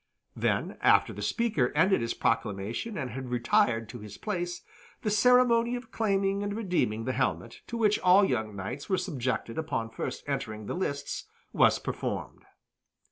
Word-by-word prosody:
Then, - - -1
after - - +4
the - - -7
speaker 215 - +1
ended 190 +5 +4
his 115 - -2
proclamation 110 - -1
and 130 -6 -3
had 130 +2 -6
retired 120 -2 +2
to 120 - -8
his 105 -1 -10
place, 175 -4 -3 0.4
the 210 - 0
ceremony 240 +1 +4
of 245 -2 -8
claiming 195 -2 +1
and 205 0 -2
redeeming 175 - 0
the 130 - 0
helmet, 125 -2 -2
to 235 - -4
which 210 -2 +3
all 185 +2 +6
young 110 - -1
knights 110 +9 -6
were 190 - +2
subjected 130 -8 -2
upon 115 -8 -2
first - - -5
entering 130 -7 -3
the - - -3
lists, 140 -6 -3 0.3
was - - +5
performed. - - -5
155 Hz, 160 wpm, -29 LUFS, -, 0.4 s, all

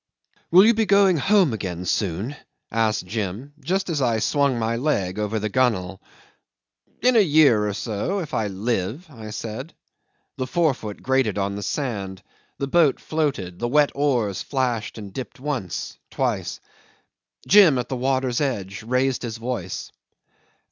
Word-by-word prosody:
"Will 185 +4 +7
you 230 - +6
be 220 -1 +1
going 200 -3 +5
home 190 - +3
again 90 -4 -4
soon?" 100 - -1 0.4
asked 110 -3 +1
Jim, 110 +7 -4
just 190 +6 0
as 160 -5 -1
I 120 -3 +2
swung 140 +3 +1
my 115 0 0
leg 105 -8 -1
over 105 +1 -1
the 110 0 -1
gunwale. 100 -6 0 1.0
"In 250 0 +4
a - - +7
year 145 - +4
or 105 - -2
so 110 - -2
if 170 -6 -5
I 110 - 0
live," 105 - -2
I 110 -5 -9
said. 115 +7 -6 0.6
The 130 - -2
forefoot 130 -10 -1
grated 130 -6 +1
on 100 0 -1
the 100 - -5
sand, 100 -7 -3 0.3
the 140 - -2
boat 150 0 +3
floated, 135 - -2
the 120 - -1
wet 145 +3 +3
oars 125 -9 0
flashed 125 -6 -2
and 100 -3 -8
dipped 130 +2 -7
once, 130 - -4
twice. - - -2 0.9
Jim, 190 -9 +7
at 125 -1 -2
the 130 - -3
water's 130 0 0
edge, 110 -7 -2
raised 125 +3 0
his 115 -2 -4
voice. 115 -6 -4
120 Hz, 155 wpm, -23 LUFS, 105-145 Hz, 1.0 s, Will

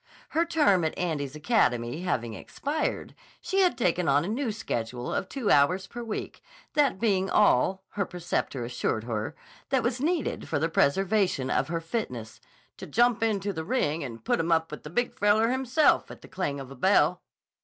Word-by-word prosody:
Her 330 +2 +1
term 295 - +3
at 160 - -2
Andy's 150 -5 -2
academy 125 - +1
having 120 -10 -2
expired, 290 - -3 0.3
she 385 - -1
had 365 -2 +3
taken 180 -7 +1
on 145 +3 +3
a - - -4
new 235 +3 -1
schedule 120 - -4
of - - -2
two 260 -7 -1
hours 180 +7 +4
per 240 +5 -8
week: 225 -2 -5 0.3
that 285 -10 +2
being 195 -4 +1
all, 190 0 +3
her 200 -2 -2
preceptor 170 -7 -3
assured 115 -2 -2
her, 110 -2 -3 0.3
that 265 -3 +2
was 245 +1 -1
needed 330 +1 -1
for 160 - 0
the 160 +3 0
preservation 185 -3 +1
of - - +1
her 165 +1 -2
fitness 125 - -5 0.4
"to - - -8
jump 240 -1 +2
in 220 -3 +1
the 190 -5 -3
ring 160 - 0
and 115 -4 -8
put - - +1
'em 165 +1 0
up 160 -1 +2
with 150 - -7
the 150 - -9
Big 245 +9 -1
Feller 210 +3 +3
himself 265 +4 +2
at - - -11
the - - -11
clang 145 -7 -3
of 135 -1 -8
the 135 - -10
bell." 175 +3 +3
185 Hz, 185 wpm, -27 LUFS, 140-230 Hz, 0.4 s, hours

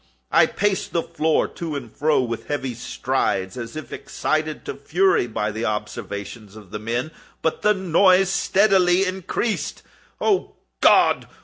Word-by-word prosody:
I - - +6
paced 205 -2 -1
the 170 - +1
floor 160 -1 +1
to 165 -3 -6
and 120 -6 -7
fro 150 -2 +2
with 115 -2 -5
heavy 135 -4 -2
strides, 95 -4 -2
as 115 0 -7
if 155 - -7
excited 155 0 -2
to 435 - -4
fury 385 - +2
by 110 -2 -2
the 110 +3 -3
observations 105 -1 -5
of 105 -4 -13
the 105 - -4
men—but 120 +8 -4
the 210 0 +3
noise 185 +1 +4
steadily 190 -2 +3
increased. 190 +4 -2 0.4
Oh 405 -3 0 0.2
God! - - +4
155 Hz, 140 wpm, -22 LUFS, 115-185 Hz, 0.4 s, I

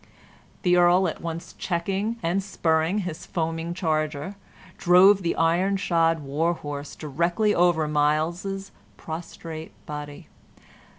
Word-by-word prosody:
The 180 -2 +4
earl, 175 +1 +5
at 160 - -5
once 170 +1 -6
checking 195 +5 -2
and 175 +4 +1
spurring 170 0 0
his 165 -3 -6
foaming 165 0 -2
charger, 155 -1 -1 0.5
drove 190 +2 +6
the 170 - -1
iron 175 +4 +2
shod 165 -4 +2
war 155 +5 0
horse 145 -2 -6
directly 170 +8 0
over 170 -4 +3
Myles's 165 +6 0 0.3
prostrate 160 0 -7
body. 145 -1 -7
170 Hz, 115 wpm, -25 LUFS, 160-185 Hz, 0.5 s, drove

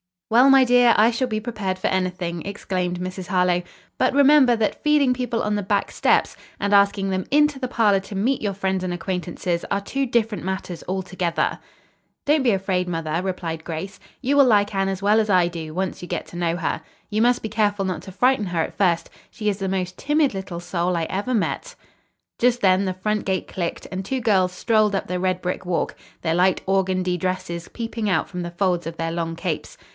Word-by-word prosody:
"Well, 245 +4 +6
my 270 -1 +7
dear, 245 -1 +5
I 220 +3 +5
shall 255 +2 -1
be 215 -2 -2
prepared 210 -5 -3
for 185 - -1
anything," 180 -2 -2
exclaimed 185 -3 -3
Mrs. 185 0 -5
Harlowe; 180 -2 +2 0.4
"but 255 - +2
remember 280 -3 +6
that 220 -2 -1
feeding 295 -4 +3
people 245 -2 -2
on 210 - 0
the 205 - -1
back 200 +1 0
steps - - +2 0.2
and 200 0 0
asking 200 -1 +4
them 185 -1 -1
into 295 -1 +3
the 255 - -2
parlor 210 -5 +3
to 195 +1 -9
meet 245 +8 0
your 205 -2 -1
friends 190 -1 -1
and 180 -1 -2
acquaintances 175 0 -3
are 200 0 0
two 270 +7 -2
different 225 -5 0
matters 190 -2 -4
altogether." 185 -2 -1 0.7
"Don't 295 -1 +3
be 245 - +4
afraid, 190 -2 0
mother," 165 -1 -2
replied 170 -4 -4
Grace. 170 +4 -5 0.2
"You 280 +2 +1
will 280 - +7
like 210 -3 +3
Anne 195 0 +1
as 195 0 -3
well 210 +2 +4
as 215 -1 0
I 180 -3 +4
do, 160 -2 -7
once 190 +1 -3
you 175 - -7
get - - -3
to 175 - -9
know 170 -1 0
her. 175 -2 -2 0.3
You 215 +1 0
must 245 +1 +3
be 220 - -3
careful 205 -2 +1
not 185 -4 -3
to 190 - -9
frighten 245 +1 +2
her 175 -2 0
at - - -4
first. 170 -4 +1 0.2
She 210 -1 -2
is 200 0 -2
the 195 - -2
most 185 -1 -2
timid 295 -2 +2
little 190 -3 -5
soul 175 0 -1
I 165 - 0
ever 205 +7 -2
met." - - -2 0.6
Just 245 0 +2
then 190 0 +4
the 185 - -1
front 210 +3 -2
gate 190 -1 -1
clicked 175 -2 -4
and 190 0 -3
two 260 +5 -2
girls 190 -5 +2
strolled 215 +1 +2
up 195 - -2
the 180 0 -2
red 185 0 0
brick 180 +1 -3
walk, 180 -1 -1 0.3
their 160 -1 0
light 180 +2 +3
organdie 185 -2 +1
dresses 180 -1 -3
peeping 225 -2 -4
out 180 -5 +1
from 180 -1 -5
the 170 - -5
folds 175 -2 0
of 165 - -5
their 165 0 -2
long 165 -1 -3
capes. 170 -2 -4
190 Hz, 215 wpm, -23 LUFS, 180-220 Hz, 0.7 s, my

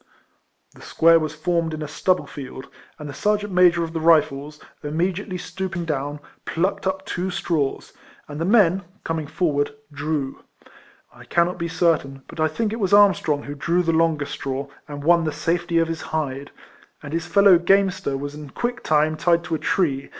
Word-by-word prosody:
The - - -17
square 165 0 +4
was 155 -1 -4
formed 165 0 -1
in 155 - -5
a - - -5
stubble 180 +2 0
field, 135 -1 -8 0.3
and 150 - -8
the 140 - -7
sergeant 205 +5 0
major 175 -2 +5
of 165 0 -5
the 165 - -2
Rifles, 150 -2 +2 0.2
imme 165 +6 0
diately 185 0 -6
stooping 180 -3 -4
down, 145 -1 -3 0.2
plucked 185 +3 -1
up 190 0 -2
two 185 0 -3
straws, 160 -6 -2 0.3
and 150 +1 -6
the - - 0
men, 195 -3 +4 0.2
coming 160 -2 -3
forward, 145 -3 -1 0.2
drew. 145 -2 -3 0.7
I - - -14
cannot 175 +1 +1
be 170 - -2
quite 165 - -8
certain, 135 -6 +1
but - - -11
I 155 - +3
think 215 +7 -2
it 230 - -4
was 195 -2 0
Armstrong 190 -8 +4
who 145 - -6
drew 170 +5 0
the 165 - +1
longest 160 -3 +1
straw, 135 +1 -4 0.2
and 145 -1 -7
won 170 +2 +4
the 155 - -1
safety 170 +2 -1
of 165 0 +3
his 165 0 -4
hide; 140 -3 -3 0.5
and 145 +1 -7
his 165 0 -2
fellow 200 -2 +6
gamester 190 -6 +2
was 145 +1 -5
in 150 -1 -9
quick 240 - -3
time 155 0 +2
tied 170 +1 +2
to 165 -1 -5
a 160 - 0
tree? 145 -4 0
165 Hz, 190 wpm, -22 LUFS, 145-180 Hz, 0.7 s, fellow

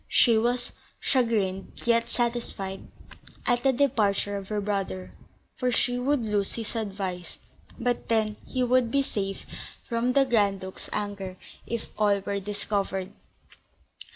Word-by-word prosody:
She 235 -3 +6
was 240 +2 +1 0.2
chagrined, 215 -7 +1
yet 230 -1 +3
satisfied, 235 -5 -2 0.6
at 245 -1 +3
the 270 - +4
departure 220 -7 +2
of 195 -1 -5
her 210 -1 0
brother; 195 -2 -2 0.5
for 250 -1 +1
she 245 +1 +1
would 275 +1 +2
lose 205 -2 0
his 230 0 -4
advice, 195 -5 -3 0.4
but 245 -1 -1
then 215 -2 +2
he 255 -1 0
would 250 -1 +4
be 275 +3 +3
safe 195 -6 -3 0.4
from 235 +1 +1
the 275 0 +5
Grand 205 -6 +3
Duke's 190 0 -5
anger 200 -3 -3 0.3
if 235 -1 -2
all 205 -1 +4
were 200 +1 -2
discovered. 200 -1 -2
215 Hz, 135 wpm, -27 LUFS, 200-245 Hz, 0.6 s, She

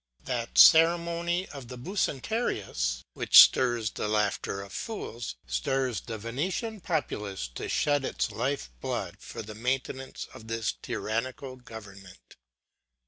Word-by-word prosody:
That 120 -2 -3
ceremony 170 +2 +5
of 140 -4 -9
the 125 +1 -8
Bucentaurius, 125 - -1
which - - +7
stirs 120 -4 +6
the - - -3
laughter 105 -2 0
of 100 - -12
fools, 120 - -5
stirs 120 - -1
the 115 -2 -6
Venetian 180 - -3
populace 105 - -2
to - - -6
shed 145 -1 +2
its - - -1
life 130 - -2
blood - - -3
for - - -8
the 110 +1 -8
maintenance 130 +3 -3
of 110 - -12
this 115 -1 -1
tyrannical 130 +4 -3
government. 100 -6 -13
125 Hz, 125 wpm, -28 LUFS, 105-145 Hz, -, which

